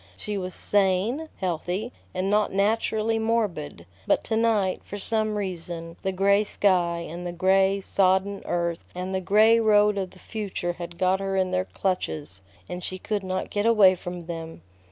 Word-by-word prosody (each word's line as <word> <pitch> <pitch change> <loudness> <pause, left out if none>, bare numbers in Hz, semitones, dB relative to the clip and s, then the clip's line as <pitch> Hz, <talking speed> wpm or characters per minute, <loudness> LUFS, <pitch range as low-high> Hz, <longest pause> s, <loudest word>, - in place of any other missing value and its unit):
She 210 - -4
was 185 -2 -4
sane, 205 +10 +1
healthy, 185 +5 -2 0.2
and 185 +1 -2
not 210 +1 +2
naturally 220 +2 +1
morbid; 210 - -1 0.2
but - - +2
to 220 - -2
night, 220 -4 +1
for 205 - -7
some 215 +1 0
reason, 170 -4 -5
the 190 - -1
gray 200 +2 +3
sky, 175 -5 +1
and 170 +2 -7
the 175 - -3
gray, 190 +2 +3
sodden 195 +1 +1
earth, 170 -1 -2
and 185 +1 -4
the 190 - 0
gray 215 +4 +5
road 210 -2 +4
of 190 -1 -3
the 185 - -17
future 195 -4 -4
had 175 -1 -8
got 185 +1 +2
her 195 0 -2
in 185 -1 +1
their 185 0 0
clutches, 155 - -2 0.3
and 180 0 -6
she 185 - -3
could 210 +2 -2
not 185 0 -3
get 205 +2 0
away 210 -5 +6
from 175 -1 -7
them. 165 - -7
190 Hz, 175 wpm, -25 LUFS, 180-210 Hz, 0.3 s, away